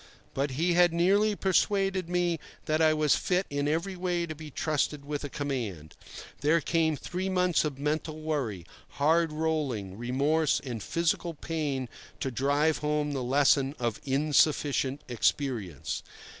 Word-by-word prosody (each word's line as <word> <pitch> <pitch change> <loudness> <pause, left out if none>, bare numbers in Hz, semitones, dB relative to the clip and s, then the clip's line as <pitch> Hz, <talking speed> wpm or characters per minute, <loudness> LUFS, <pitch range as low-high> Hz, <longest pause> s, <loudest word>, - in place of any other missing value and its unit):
But 140 +2 0
he 175 +3 +2
had 175 -1 +5
nearly 200 +5 +3
persuaded 195 -1 +1
me 175 -2 +1 0.3
that 155 +1 +1
I 160 -1 +5
was 155 -2 +3
fit 185 +1 0
in 145 0 -1
every 170 +6 -1
way 175 -1 -1
to 160 - -5
be 155 0 -9
trusted 150 -1 -1
with 145 0 -4
a 145 - -4
command. 115 - -4 0.4
There 155 +4 +3
came 160 0 +1
three 185 +5 -3
months 180 -2 +2
of 150 -4 -3
mental 155 +2 -2
worry, 135 - -2 0.3
hard 160 +3 +3
rolling, 150 -11 -2
remorse, 140 +6 +1
and 120 -5 -6
physical 170 - -1
pain 145 -5 -3 0.3
to 135 - -2
drive 145 +5 +1
home 150 0 0
the 135 -2 -2
lesson 135 +2 +3
of 120 -4 -2
insufficient 145 0 +2
experience. 120 - -1
150 Hz, 145 wpm, -29 LUFS, 135-170 Hz, 0.4 s, had